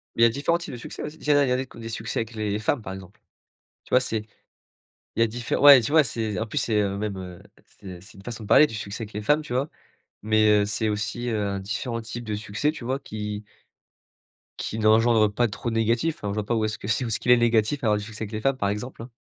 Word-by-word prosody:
Il 115 - -1
y - - +10
a - - +6
différents 145 +7 0
types 170 -6 -8
de - - -6
succès - - -7
aussi. 150 +1 -7
Il 150 - -1
en - - +5
a 140 - +4
il - - -1
y - - +2
en 130 - +1
a 130 - -2
des 115 0 -6
succès 110 +2 -3
avec 115 0 -4
les 105 -1 -2
femmes 115 +3 0
par 95 - -6
exemple. 95 +1 -11 0.7
Tu - - -20
vois, 125 - +5
c'est 110 -4 -2 0.9
il - - -4
y - - +6
a - - +3
différe 120 +3 -3
ouais 140 -3 +10
tu 130 - -3
vois, 155 -1 +6
c'est 110 -5 -3
en 115 - -1
plus - - -6
c'est, 110 -2 +2
heu, 100 -1 -1
même, 105 -2 -3
heu, 90 -2 -8 0.4
c'est 90 -3 -9
c'est 95 - -14
une 95 - -14
façon 115 -1 -6
de - - -9
parler 150 - +7
du - - -10
succès 105 +2 -5
avec 105 - -10
les 105 - -4
femmes, 150 +8 +2
tu 150 -4 -7
vois, 135 +4 0 0.5
mais 110 0 +3 0.2
heu, - - -1
c'est 110 +1 -1
aussi, 105 +4 -2
heu, 100 -3 -1
différents 115 +4 -3
types 115 +2 -7
de 105 -1 -3
succès, 105 +8 -1
tu 130 - -9
vois, 130 +3 -1
qui 105 -3 -6 1.1
qui 110 - -4
n'engendrent 110 0 +4
pas 120 +3 +1
trop 105 +3 -4
de 115 - -3
négatif, 115 +8 +1
enfin 100 - -4
je - - -3
vois 105 -1 -2
pas 120 - 0
où 110 -1 +1
est-ce 110 - -3
que 100 - -7
c'est 115 +3 +1
où - - -3
ce - - 0
qu'il 125 - -4
est 125 - +8
négatif 120 +3 +2
à - - +2
avoir 105 0 +3
du - - -6
succès 110 0 -7
avec 105 - -6
les 110 0 -4
femmes, 135 -1 +1
par 100 -4 0
exemple, 115 +3 -5
hein. 125 - -10
110 Hz, 290 wpm, -25 LUFS, 105-120 Hz, 1.1 s, y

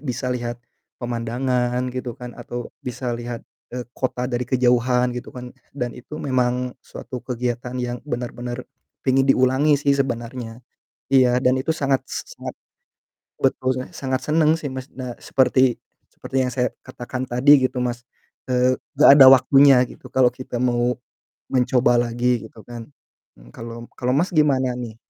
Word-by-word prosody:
bisa 125 -2 -3
lihat 120 -1 -4 0.4
pemandangan 125 +1 -1
gitu 125 -2 -5
kan, 125 -1 -8
atau 120 0 -7
bisa 125 0 -4
lihat, 120 0 -6 0.2
eee, 125 0 -6
kota 125 -1 -2
dari 125 -1 -2
kejauhan 125 -1 +2
gitu 125 +1 -6
kan 125 0 -8 0.2
dan 125 -3 -2
itu 140 +5 -10
memang 125 -3 0
suatu 125 - -8
kegiatan 125 0 -4
yang 125 0 -3
benar-benar 120 -1 -5 0.4
pengin 135 0 +3
diulangi 135 +3 +4
sih 140 0 +1
sebenarnya. 120 -3 -3 0.5
Iya 125 -2 +4
dan 130 0 +3
itu 135 +5 0
sangat 140 -4 0
s - - -7
sangat - - -6 0.9
betul, 130 -1 +1
saya 130 - -7
sangat 130 -1 -2
senang 155 0 +3
sih, 150 - -4
Mas, 130 0 -6
nah 125 -2 -7
seperti 130 -2 +2 0.3
seperti - - -10
yang 125 - -2
saya 125 0 0 0.2
katakan 125 +1 -6
tadi 125 +4 +3 0.2
gitu, 130 - -6
Mas, 120 -1 -3 0.5
eee, 125 0 +3 0.2
gak 150 - +8
ada 140 -2 +9
waktunya 135 0 +6
gitu - - -14
kalau 130 -1 +4
kita 125 -2 -6
mau 125 0 +1 0.5
mencoba 125 -1 +3
lagi 120 -1 0
gitu 110 - -18
kan. 120 -1 -8 0.5
Mmm, - - -17
kalau 115 0 -8
m - - -10
kalau, 125 0 0
Mas, 175 +8 +1
gimana 135 -4 +3
nih? 120 -3 -6
125 Hz, 155 wpm, -22 LUFS, 120-130 Hz, 0.9 s, ada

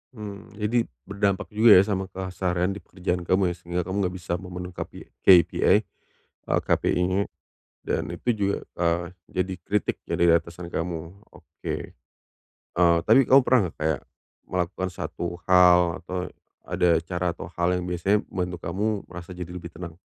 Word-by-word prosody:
Mmm, 105 -1 -9
jadi 110 +3 0 0.2
berdampak 100 +1 -1
juga 110 +1 +7
ya 95 - +8
sama 95 -2 -2
keseharian 90 -1 -2
di 100 - -6
pekerjaan 90 -1 -3
kamu 95 -1 +3
ya, 85 - -5
sehingga 85 +1 -2
kamu 95 +2 -4
enggak 90 - -6
bisa 85 -1 -4
memenuh 90 -1 -7
KP - - -6 0.3
KPI, 90 -4 +5 0.7
eee, - - +4
KPI-nya 90 +2 +1 0.7
dan - - 0
itu 85 +8 -4
juga, 100 -1 0 0.2
eee, 85 0 +1 0.3
jadi 95 0 -1
kritik 105 0 0
dari 85 - +1
atasan 85 +1 +1
kamu, 85 +3 -5
oke. - - -7 1.0
Eee, 85 -1 +5
tapi 125 +4 +5
kamu 135 +1 +7
pernah 130 0 +4
nggak, - - -12
kayak 80 -2 -1 0.5
melakukan 95 +1 -2
satu 85 -1 -5
hal 90 -2 +6
atau 90 0 -5 0.3
ada 90 - +1
cara 90 0 -2
atau 85 - -8
hal 90 +1 +2
yang 90 - -2
biasanya 90 +4 +1
membantu 90 -1 -2
kamu 100 +4 -1 0.3
merasa 90 +1 -8
jadi 90 -1 -6
lebih 85 -1 -8
tenang? 85 0 -8
90 Hz, 155 wpm, -25 LUFS, 85-95 Hz, 1.0 s, ya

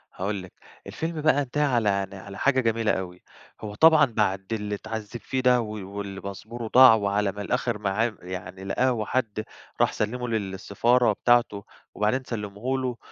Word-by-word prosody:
هاقول 95 0 -3
لِك، 90 - -13 0.3
الفيلم 160 -1 -4
بقى 150 -2 +3
انتهى 145 +3 -1
على 105 -7 +1
ن - - -11
على 100 +1 -10
حاجة 130 -2 +2
جميلة 115 -1 +1
أوي، 90 -1 -5 0.4
هو 105 -1 -6
طبعًا 160 +2 +6
بعد 105 -4 -1
اللي 105 -1 -2
اتعذّب 110 +2 -6
فيه 130 - -2
ده 125 -1 +4
و 115 - -5 0.3
واللي 100 -1 -5
باسبوره 110 +4 -7
ضاع 125 0 +8
وعلى 100 -1 0
ما 105 +1 -7
الآخر 120 +1 -1
معاه 105 +3 0
يعني 95 +1 -7
لقاه 125 +7 +1
وحد 110 -1 -2 0.4
راح - - +4
سلّمه 125 +4 -2
لل 110 -5 -2
للسفارة 115 +6 +2
بتاعته، 120 -4 +2 0.3
وبعدين 110 +6 0
سلّمه 110 +2 -3
له، 125 -2 -3
110 Hz, 170 wpm, -25 LUFS, 100-125 Hz, 0.4 s, ضاع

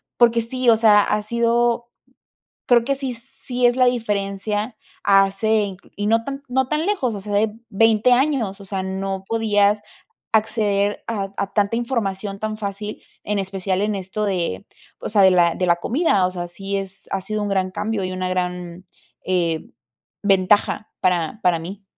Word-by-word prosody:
porque 235 -1 +4
sí, 250 +1 0
o 225 - +6
sea, 215 -2 +6
ha 210 +1 0
sido, 235 +1 +1 0.8
creo 240 -2 +5
que 275 +2 0
sí 265 -2 -3
sí 250 0 -1
es 240 - +2
la 255 -1 +4
diferencia, 210 -1 -1 0.3
hace 195 +2 +3
incl 195 -1 -10
y 205 +1 -2
no 225 +1 +3
tan 275 +1 -4
c - - -31
no 260 +1 +1
tan 305 +5 0
lejos, 270 - 0
o 205 - -5
sea, 205 +1 -6
de 210 +1 +2 0.2
20 225 +3 +3
años, 245 -7 +1
o 200 - -11
sea, 195 -1 -3
no 190 0 -3
podías 210 -2 +2 0.5
acceder 210 -2 +1
a 200 -4 -3
a 200 - -3
tanta 205 +1 +1
información 205 -5 -2
tan 215 0 -3
fácil, 210 0 -5 0.3
en 210 0 -1
especial 190 -1 -2
en 210 +1 0
esto 195 +2 -3
de, 175 - -2 0.3
o - - -5
sea, 210 -2 +3
de 190 - +8
la 175 -2 +4
de 180 - -1
la 170 - +5
comida, 220 - +1
o 185 - -1
sea, 175 -1 -5
sí 195 +3 -4
es 195 0 -7
ha 195 - -1
sido 215 +2 -3
un 205 - -2
gran 190 -1 0
cambio 210 +1 -2
y 185 - -3
una 185 0 -2
gran, 180 -1 -3 0.4
eh, 170 -3 -1 0.5
ventaja 205 +2 +2
para 180 +2 0
para 175 -2 +3
mí. 195 +5 -8
205 Hz, 185 wpm, -21 LUFS, 190-230 Hz, 0.8 s, de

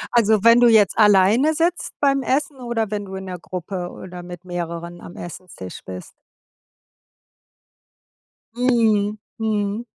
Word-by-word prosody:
Also 220 -2 +4
wenn 230 +1 +7
du 240 - +6
jetzt 215 -4 +5
alleine 210 +9 +5
sitzt 340 +2 -1
beim 275 -1 +2
Essen 275 +2 -1
oder 230 -3 -2
wenn 205 -1 -2
du 190 -1 -8
in 190 - -6
der 180 -2 -6
Gruppe 180 0 -5
oder 180 -1 -9
mit 175 0 -10
mehreren 170 -1 -5
am 170 - -11
Esstisch 175 - -9
bist? 90 -1 -9 2.4
Mhm. 220 -4 +2 0.2
Mhm. 215 0 -1
205 Hz, 130 wpm, -21 LUFS, 180-235 Hz, 2.4 s, wenn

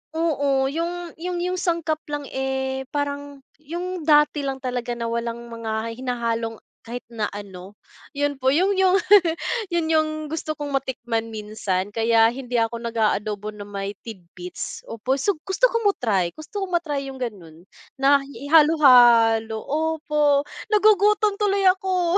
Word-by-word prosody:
oo. 285 -5 +1
Yung 340 +1 -4
yung 355 +1 -3
yung 365 0 -1
sangkap 335 -3 -1
lang, 290 -1 -3
eh, 265 0 -2
parang 285 -1 -3 0.2
yung 350 +2 -5
dati 295 -1 +4
lang 270 -1 -3
talaga 245 -1 -3
na 230 -1 -3
walang 235 0 -4
mga 225 -1 -3
hinahalong 230 -3 -2 0.3
kahit 240 +1 -7
na 215 -2 -2
ano, 195 -1 -9 0.4
'yon 285 -1 -1
po 260 - +3
yung 380 +5 +3
yung 380 0 +4 0.7
'yon 340 -2 0
yung 310 -1 +3 0.2
gusto 310 -1 -3
kong 290 -1 -5
matikman 240 -4 -2
minsan. 210 -3 -3
Kaya 225 0 +4
hindi 245 -2 -3
ako 230 +1 0
nag-aadobo 215 -2 -1
na 210 - -11
may 200 0 -5
tidbits, 295 - -8
opo. 230 +4 -2
So, 360 +4 0
gusto - - +2
ko 465 - 0
mo-try, 200 - +1
gusto 390 +6 -6
ko - - -1
ma-try 300 -5 -1
yung 265 -1 -9
gano'n 175 -8 -7 0.4
na 280 +1 +5
hi 280 0 -9
ihalo-halo, 240 -8 +6
opo. 300 -1 +1 0.3
Nagugutom 420 0 +4
tuloy 400 -1 +2
ako. 365 -1 +1
270 Hz, 145 wpm, -23 LUFS, 230-325 Hz, 0.7 s, ihalo-halo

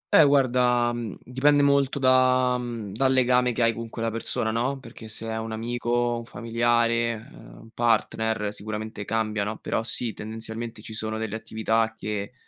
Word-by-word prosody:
Eh, 160 - +9
guarda, 125 -3 +3
mhmm, 120 -4 -5
dipende 145 +3 +3
molto 140 -1 +3
da 130 -1 +4
mhmm, 115 -4 -5
dal 130 +4 +2
legame 125 -1 +3
che 120 0 0
hai 115 0 +3
con 115 0 -6
quella 115 0 -3
persona, 110 0 -1
no, 125 +5 -1
perché 115 -2 -11
se 110 +1 -4
è 110 0 -2
un 110 0 -5
amico, 120 +1 -1
un 115 - -7
familiare, 115 -1 0
uhm, - - -14
un 115 - -15
partner, 110 -2 0
sicuramente 105 0 -5
cambia 110 -1 -1
no, 105 +2 -3
però, - - -2
sì, 115 0 -3
tendenzialmente 110 +1 -6
ci 110 - -8
sono 110 0 -3
delle 110 -1 -3
attività 110 0 0
che 105 +1 -4
115 Hz, 175 wpm, -25 LUFS, 110-125 Hz, -, Eh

